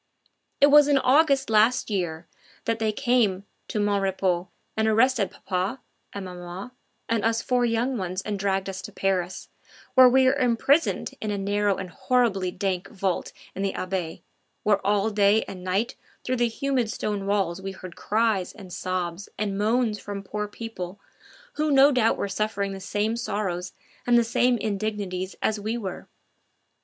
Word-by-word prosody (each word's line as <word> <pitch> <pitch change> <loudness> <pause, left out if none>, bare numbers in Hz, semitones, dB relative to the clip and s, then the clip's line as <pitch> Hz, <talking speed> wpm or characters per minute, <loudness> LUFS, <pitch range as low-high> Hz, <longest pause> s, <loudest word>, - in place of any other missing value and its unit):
It 285 0 +6
was 295 0 +8
in 285 -1 +4
August 275 +1 +4
last 220 +2 +3
year 175 -4 -2 0.4
that 230 0 0
they 220 -1 +1
came 220 -6 +1 0.2
to 215 - -2
"Mon 205 -1 +1
Repos" 185 -2 0 0.3
and 220 0 +1
arrested 225 -2 +3
papa, 190 +7 -3 0.3
and 200 -1 -6
maman, 180 +5 -8 0.4
and 225 -2 0
us 225 0 +1
four 250 -1 +2
young 235 +2 0
ones 185 0 -3
and 205 -2 -3
dragged 195 -1 0
us 190 -1 -5
to - - -9
Paris, 185 -2 -2 0.4
where 255 -1 +8
we 260 +1 +4
were 260 - +5
imprisoned 275 +4 +2
in 215 - -2
a 205 - -1
narrow 205 0 +1
and 185 -2 -6
horribly 225 -8 +1
dank 185 0 -2
vault 190 -4 -2 0.2
in 195 - -5
the 195 -1 0
Abbaye, 185 -3 -4 0.4
where 205 -2 +2
all 205 +2 +2
day 205 +1 +4
and 185 -2 -9
night 195 +5 0 0.3
through 255 0 -1
the 240 0 +3
humid 260 -1 -1
stone 205 -2 -3
walls 190 -3 0
we 195 0 -4
heard 185 -2 -10
cries 215 -4 0
and 190 -5 -11
sobs 185 0 -3
and 205 -2 -1
moans 215 +1 +1
from 200 -1 -6
poor 210 +2 -4
people, 205 -4 -7 0.6
who 305 0 +1
no 280 0 +6
doubt 245 -4 +2
were - - -1
suffering 200 0 -2
the 195 - -6
same 205 +3 -1
sorrows 200 -6 -3 0.3
and 240 0 +5
the 235 - +5
same 245 +2 +2
indignities 200 -3 -3
as 220 -1 +1
we 220 +3 -2
were. 195 -6 -6
205 Hz, 170 wpm, -25 LUFS, 190-235 Hz, 0.6 s, was